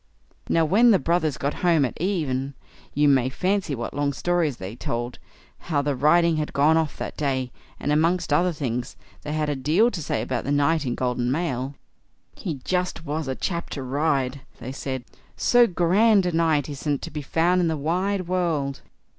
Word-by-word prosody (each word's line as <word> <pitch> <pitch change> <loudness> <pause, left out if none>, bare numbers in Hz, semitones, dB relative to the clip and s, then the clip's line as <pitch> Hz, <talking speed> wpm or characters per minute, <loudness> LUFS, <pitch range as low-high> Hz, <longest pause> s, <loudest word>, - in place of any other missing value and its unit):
Now, 165 -1 +3
when 220 +9 +5
the 210 - +6
brothers 165 -5 0
got 140 0 -1
home 165 -5 +4
at 125 - -4
even, 140 -8 -1 0.4
you 145 +1 +4
may 130 -3 +3
fancy 185 +1 -1
what 120 -1 -5
long 145 0 0
stories 170 -5 0
they 95 +2 -7
told, 120 0 -4 0.5
how 145 -3 +1
the 145 -1 0
riding 165 +4 +4
had 150 -1 -3
gone 145 +3 +4
off 160 -3 0
that - - -5
day; 130 -4 -1 0.3
and 145 - -1
amongst 165 +1 +2
other 175 +4 +3
things, 125 -6 -3 0.3
they 150 - -5
had 155 -1 0
a 145 - -1
deal 160 - +2
to 170 - -5
say 145 - -2
about 125 -2 -2
the 140 - -2
knight 145 +1 +2
in 120 - -1
golden 125 -1 -1
mail. 135 -3 -2 0.6
"He 165 -5 -4
just 180 -2 -2
was 155 0 -3
a 130 - -2
chap 170 +2 -3
to 135 - -4
ride!" 140 -1 0 0.2
they 130 - -7
said; 130 -2 -4 0.3
"so 245 -1 +5
grand 190 +3 +3
a 180 - +1
knight 160 -3 +2
isn't 145 -1 -3
to 170 - -6
be 150 0 -4
found 170 +6 +2
in 170 - +2
the 160 -1 -1
wide 185 +5 -1
world." 165 -7 -1
150 Hz, 190 wpm, -24 LUFS, 135-175 Hz, 0.6 s, the